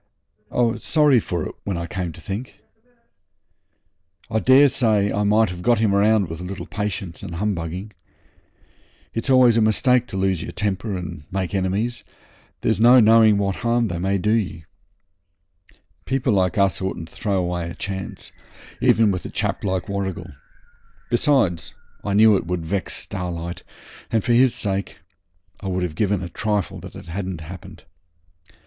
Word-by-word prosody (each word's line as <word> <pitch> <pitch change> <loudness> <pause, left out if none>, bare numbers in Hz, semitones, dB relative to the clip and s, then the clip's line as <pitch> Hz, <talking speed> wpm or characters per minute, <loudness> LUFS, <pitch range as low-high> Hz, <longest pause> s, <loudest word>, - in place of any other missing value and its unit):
I - - 0
was 115 -1 0
sorry 150 -5 +4
for 85 -6 -3
it - - -8
when 95 -3 -3
I 85 - -3
came 90 -1 -4
to 85 - -13
think. 100 +9 -6 1.7
I 110 - +2
daresay 125 -6 +4
I 105 - 0
might 105 0 +3
have 90 0 -7
got 120 +5 +3
him 105 -2 +2
round 105 0 +3
with 80 +1 -7
a - - -6
little 95 +2 -6
patience 100 -4 -4
and 85 - -7
humbugging. 95 0 -3 1.2
It's 115 +3 -3
always 125 -3 +6
a - - +4
mistake 125 +3 +3
to 95 - -5
lose 95 -3 0
your - - -6
temper 100 0 -2
and 85 -4 -7
make 95 -1 -2
enemies; 100 +5 -1 0.6
there's 110 0 +1
no 125 +2 +8
knowing 110 -2 +6
what 100 -1 -1
harm 120 -1 +1
they 85 -1 -3
may 95 +2 0
do 105 +3 0
ye. 95 -8 -1 1.4
People 130 -3 0
like 95 -2 +1
us 100 -3 +2
oughtn't 90 -3 -4
to - - -18
throw 100 -3 -1
away 90 -2 -2
a - - -8
chance, 95 0 -6 0.5
even 110 -2 +4
with 90 -2 -3
a - - -4
chap - - -2
like 95 -1 -1
Warrigal. 95 -3 -4 0.8
Besides, 120 - +1 0.3
I 100 -1 -1
knew 110 0 +6
it 95 - -2
would 90 -2 -2
vex 95 +3 -2
Starlight, 85 -2 -5 0.5
and 110 -3 +1
for 120 - +2
his 125 +1 +4
sake 100 -1 -3 0.6
I - - -7
would 95 -1 -1
have 90 -3 -3
given 100 +1 0
a - - -4
trifle 100 -2 -2
it 95 - -10
hadn't 95 -1 -5
happened. 85 +3 -10
100 Hz, 165 wpm, -22 LUFS, 90-110 Hz, 1.7 s, no